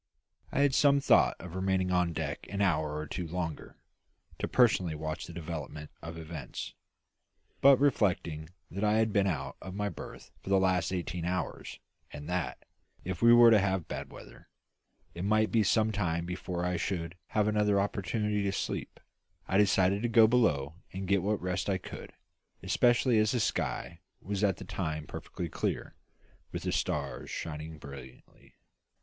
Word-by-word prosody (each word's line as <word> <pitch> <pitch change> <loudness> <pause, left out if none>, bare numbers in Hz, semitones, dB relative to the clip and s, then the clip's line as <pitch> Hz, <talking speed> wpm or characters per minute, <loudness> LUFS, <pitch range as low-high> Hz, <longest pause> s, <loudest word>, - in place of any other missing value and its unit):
I 140 - +1
had 140 -1 +4
some 140 0 +5
thought - - +4
of 90 -2 -9
remaining 95 0 0
on 90 -1 +2
deck 80 -2 -4
an 100 - -4
hour 80 -6 +1
or 75 - -3
two 85 +3 -4
longer, 85 -2 -5 0.6
to - - -1
personally 95 -10 +3
watch 80 +1 -4
the - - -8
development 75 -3 -6
of 80 +1 -7
events; 80 -5 -7 0.9
but 140 -1 +8
reflecting 90 - +1 0.2
that 100 +4 -3
I 105 0 +3
had 110 -1 +2
been 100 -1 +3
out 85 -5 -3
of 95 0 -7
my 105 0 -1
berth - - -10
for - - -8
the 100 - +5
last 95 -2 +1
eighteen 90 -2 -3
hours, 90 0 -3 0.3
and 75 +1 -9
that, 90 -2 -3 0.4
if 90 -1 -4
we 115 - +7
were 120 -1 +8
to 110 - +7
have 95 -3 0
bad - - -6
weather, - - -13 0.6
it 85 - -5
might 110 +2 +2
be 115 - +4
some 110 +2 +3
time 85 -5 -1
before 90 0 -3
I 90 -1 0
should 85 0 -2 0.2
have 105 0 +4
another 105 -1 +2
opportunity 105 +1 -1
to 100 -1 0
sleep, 95 - -4 0.5
I 95 - +2
decided 95 -1 +3
to 120 - 0
go 115 -1 +7
below 85 - +2
and 95 0 -5
get 100 0 +3
what 105 +3 0
rest 90 +2 -2
I 95 - +2
could, 90 - -9 0.5
especially 120 -1 +3
as 110 +2 +2
the 125 - +1
sky 85 -5 -2 0.2
was 100 +1 -3
at 100 -4 +2
that - - -9
time 75 -1 -3
perfectly 85 - -6
clear, - - -3 0.6
with - - -5
the - - -1
stars - - -2
shining 80 0 -5
brilliantly. 70 -3 -13
95 Hz, 170 wpm, -30 LUFS, 85-105 Hz, 0.9 s, but